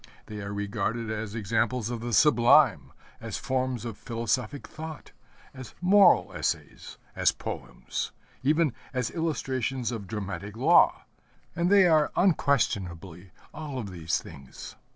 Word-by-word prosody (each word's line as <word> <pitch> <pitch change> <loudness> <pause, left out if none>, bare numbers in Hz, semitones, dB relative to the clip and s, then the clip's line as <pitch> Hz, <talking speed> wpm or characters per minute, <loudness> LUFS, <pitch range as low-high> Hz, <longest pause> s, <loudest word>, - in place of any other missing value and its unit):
They 105 -1 -7
are 100 0 -5
regarded 105 +3 -2
as 110 -1 -4
examples 115 +2 -1
of 120 - -3
the 120 +1 -4
sublime, 120 -1 +5 0.3
as - - -5
forms 130 -2 -2
of 115 -3 -6
philosophic 120 +4 -2
thought, 155 -1 -9 0.4
as 130 -3 -10
moral 190 +1 +5
essays, - - -4 0.2
as - - +3
poems, - - -5 0.3
even 150 0 +2 0.2
as 125 -3 -1
illustrations 135 -6 -2
of 110 -5 -6
dramatic 100 0 -5
law, 125 - +4 0.5
and 170 +1 +1
they 200 -2 +7
are 155 -3 +4
unquestionably 95 - 0 0.2
all 150 -3 -6
of 105 -6 -5
these 85 -2 -1
things. 65 -1 -11
120 Hz, 130 wpm, -27 LUFS, 105-145 Hz, 0.5 s, they